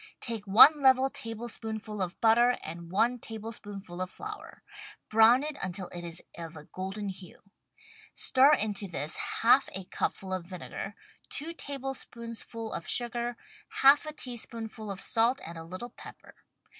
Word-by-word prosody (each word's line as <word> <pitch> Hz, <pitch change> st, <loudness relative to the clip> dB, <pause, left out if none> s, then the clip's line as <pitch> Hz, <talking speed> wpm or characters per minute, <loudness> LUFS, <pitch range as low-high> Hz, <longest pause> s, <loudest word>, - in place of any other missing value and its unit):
Take 225 Hz, -4 st, -4 dB
one 285 Hz, +10 st, +9 dB
level 265 Hz, 0 st, +5 dB
tablespoonful 225 Hz, -4 st, -5 dB
of 185 Hz, 0 st, -3 dB
butter, 235 Hz, +2 st, +5 dB
and 170 Hz, +1 st, -8 dB
one 235 Hz, +6 st, +2 dB
table 225 Hz, 0 st, -6 dB
spoonful 200 Hz, -5 st, -8 dB
of 185 Hz, -, -2 dB
flour. 425 Hz, -, -9 dB, 0.5 s
Brown 225 Hz, +4 st, +6 dB
it 300 Hz, -1 st, -4 dB
until 185 Hz, 0 st, -4 dB
it 175 Hz, 0 st, -7 dB
is 170 Hz, 0 st, -4 dB
of 165 Hz, -1 st, -8 dB
a 150 Hz, -, -10 dB
golden 195 Hz, +4 st, -5 dB
hue. 185 Hz, -2 st, -10 dB, 0.7 s
Stir 270 Hz, +3 st, +5 dB
into 210 Hz, -6 st, +1 dB
this 155 Hz, -3 st, -2 dB, 0.2 s
half 240 Hz, +4 st, +5 dB
a 190 Hz, -, -2 dB
cupful 190 Hz, +1 st, -3 dB
of 180 Hz, -2 st, -4 dB
vinegar, 190 Hz, +2 st, -7 dB, 0.3 s
two 315 Hz, +4 st, -5 dB
tablespoonsful 235 Hz, -6 st, -6 dB
of -, -, -6 dB
sugar, 240 Hz, 0 st, 0 dB, 0.5 s
half 285 Hz, +3 st, +7 dB
a -, -, -3 dB
teaspoonful 230 Hz, -5 st, -5 dB
of 195 Hz, -1 st, -5 dB
salt 235 Hz, +4 st, +3 dB
and 170 Hz, -, -8 dB
a 165 Hz, -, -7 dB
little 185 Hz, +8 st, -7 dB
pepper. -, -, -13 dB
225 Hz, 150 wpm, -29 LUFS, 190-245 Hz, 0.7 s, one